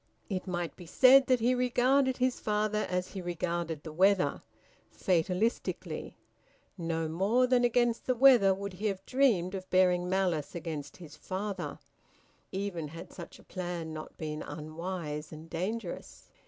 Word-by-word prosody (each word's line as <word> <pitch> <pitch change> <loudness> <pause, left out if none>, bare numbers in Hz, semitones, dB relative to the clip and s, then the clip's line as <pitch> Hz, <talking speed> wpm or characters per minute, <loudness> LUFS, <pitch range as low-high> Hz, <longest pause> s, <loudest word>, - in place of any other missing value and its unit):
It 185 0 -3
might 175 -2 -3
be 175 - -12
said 265 +8 +6
that 255 -3 +3
he 245 +3 +3
regarded 255 +2 +2
his 255 0 +1
father 210 0 0
as 180 0 -1
he 195 - -6
regarded 170 -2 -3
the 155 - -8
weather, 190 +3 +3 0.5
fatalistically. 185 +6 -1 0.6
No 165 -2 -2
more 200 +10 +2
than 250 -1 +3
against 240 -1 +2
the 255 - +2
weather 245 -6 +7
would 200 0 -3
he 205 +4 -2
have 195 -1 -3
dreamed 230 -10 +2
of 185 -1 -6
bearing 180 -1 +3
malice 180 -6 0
against 155 -4 -5
his 155 -4 -11
father, 190 +2 -4 0.7
even 190 -5 -3
had 165 +3 -10
such 170 - -10
a - - -18
plan 175 -3 -5
not 155 0 -8
been 155 -1 -4
unwise 155 0 -5
and 160 +1 -11
dangerous. 185 +3 -5
185 Hz, 150 wpm, -30 LUFS, 165-220 Hz, 0.7 s, weather